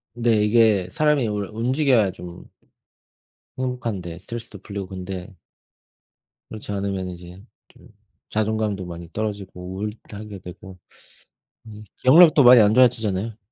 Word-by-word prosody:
네. 115 -3 +2
이게 105 -4 +3
사람이 150 -1 +1
원래 105 -2 -3
움직여야 125 -2 +2
좀 90 -1 -11 1.1
행복한데 115 -10 -4
스트레스도 115 +2 -8
풀리고 100 -2 -6
근데 95 -1 -7 1.2
그렇지 105 -1 -7
않으면 100 -2 -3
이제 90 +1 -11 0.3
좀 - - -20 0.4
자존감도 110 -2 -1
많이 85 -1 -9
떨어지고 100 -4 -5
우울도 105 +1 -7
하게 105 -2 -9
되고 90 +1 -11 0.9
음 105 -1 -11
기억력도 155 +2 +7
많이 125 -1 +8
안 105 0 +4
좋아지잖아요? 110 -4 +2
105 Hz, 300 characters per minute, -22 LUFS, 95-115 Hz, 1.2 s, 많이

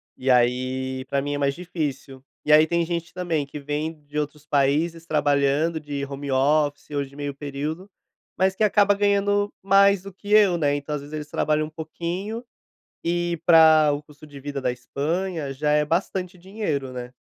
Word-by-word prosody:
e, 130 - -3
aí, 130 +1 +1
pra 140 +1 -1
mim 145 +1 -2
é 145 - -1
mais 140 -1 +1
difícil 145 -6 -5 0.2
e, 150 - +4
aí, 155 +1 +7
tem 170 0 +1
gente 170 -1 -4
também 170 -5 -1
que 145 +1 -8
vem 150 +2 -3
de 145 +1 -7
outros 150 0 -5
países 155 +4 +1
trabalhando 150 +1 +1
de 145 -2 -4
home 140 0 -6
office, 145 +2 +1
ou 145 -1 -1 0.2
meio 145 -1 -4
período, 145 +6 -5 0.5
mas 190 0 +2
que 215 - 0
acaba 205 -1 +4
ganhando 205 0 +1
mais 195 0 +5
do 195 -1 -9
que 205 +2 -9
eu, 205 -4 +5
né, 145 -2 +2
então, 145 +1 -4
às 145 - -3
vezes, 145 +2 -11
eles 150 -1 -5
trabalham 155 0 0
pouquinho, 175 +9 -5 0.6
e 175 0 -1
pra 160 -2 +7
o 145 - -3
custo 150 +1 -16
de 145 -2 -12
vida 140 0 -5
da 125 - 0
Espanha, 150 +4 -3
já 150 +2 0
é 150 0 +3
bastante 180 +2 -2
dinheiro, 170 -9 -3
né. 125 0 -7
150 Hz, 180 wpm, -24 LUFS, 140-175 Hz, 0.6 s, aí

